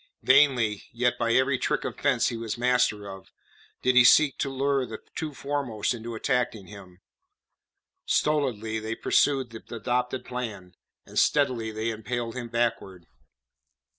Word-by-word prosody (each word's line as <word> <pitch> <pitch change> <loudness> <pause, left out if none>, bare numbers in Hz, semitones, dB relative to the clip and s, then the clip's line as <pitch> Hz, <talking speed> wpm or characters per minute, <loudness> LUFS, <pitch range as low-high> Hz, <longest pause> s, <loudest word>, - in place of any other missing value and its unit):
Vainly, 130 -6 +4
yet 125 +1 0
by 115 0 +1
every 130 0 +2
trick - - -1
of - - -4
fence 135 -4 +2
he 120 - -4
was 115 -1 -4
master 125 -4 +1
of, 95 -1 -10 0.5
did 130 0 +3
he 125 - +8
seek 140 +3 +6
to 140 - -1
lure 135 0 0
the 115 -3 -6 0.2
two 160 -3 -4
foremost 140 -6 -2
into 115 0 -7
attacking 120 -4 -1
him; 95 -2 -13 1.1
stolidly 120 -8 0
they 110 +1 -4
pursued 135 -2 +1
the 110 - -9
adopted 125 +2 -2
plan, 110 -8 -6 0.3
and - - -2
steadily 125 -6 +2
they 110 +1 -2
impelled 115 +2 -4
him 120 -2 -5
backward. 115 -6 -2
120 Hz, 145 wpm, -26 LUFS, 110-130 Hz, 1.1 s, he